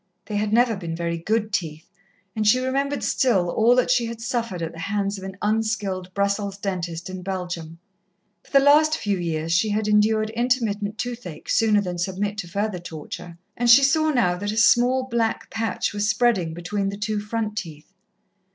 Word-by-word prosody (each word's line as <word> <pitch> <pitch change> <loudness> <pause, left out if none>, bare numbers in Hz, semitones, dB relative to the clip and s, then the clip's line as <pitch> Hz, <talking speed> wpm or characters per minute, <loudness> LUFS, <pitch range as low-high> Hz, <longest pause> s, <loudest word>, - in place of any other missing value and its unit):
They 210 - -3
had 210 0 -1
never 235 0 +3
been 170 -4 -5
very 170 0 -2
good 215 +4 -1
teeth, 160 -4 -3 0.5
and 215 -1 0
she 215 - +6
remembered 275 +2 -1
still 200 -11 +2
all 230 +5 +4
that 250 0 +2
she 240 -2 +2
had 230 0 -6
suffered 230 -6 -3
at 165 - -3
the 165 - -10
hands 200 +3 -2
of - - -11
an 190 -1 -7
unskilled 210 -4 -1
Brussels 200 0 -1
dentist 175 -4 -4
in 185 0 -6
Belgium. 180 -3 -5 0.7
For - - -22
the 275 0 +5
last 310 +2 +5
few 200 -3 -1
years 165 -1 -2
she 180 +6 +2
had 210 +1 0
endured 215 +1 +2
intermittent 225 -3 -1
toothache, 235 -8 -6
sooner 215 -2 +3
than 180 -3 -4
submit 200 +3 -2
to 180 - -5
further 200 +1 -2
torture, 170 +1 -8 0.2
and 240 0 0
she 255 +4 +8
saw 310 +3 +3
now 240 -11 +2
that 205 +2 -3
a 215 - -5
small 245 +3 +4
black 235 -3 -2
patch 225 -1 -2
was 205 0 0
spreading 205 -10 +1
between 195 +3 -2
the 200 - -6
two 210 0 -2
front 215 0 -3
teeth. 160 -4 -7
210 Hz, 190 wpm, -23 LUFS, 180-230 Hz, 0.7 s, she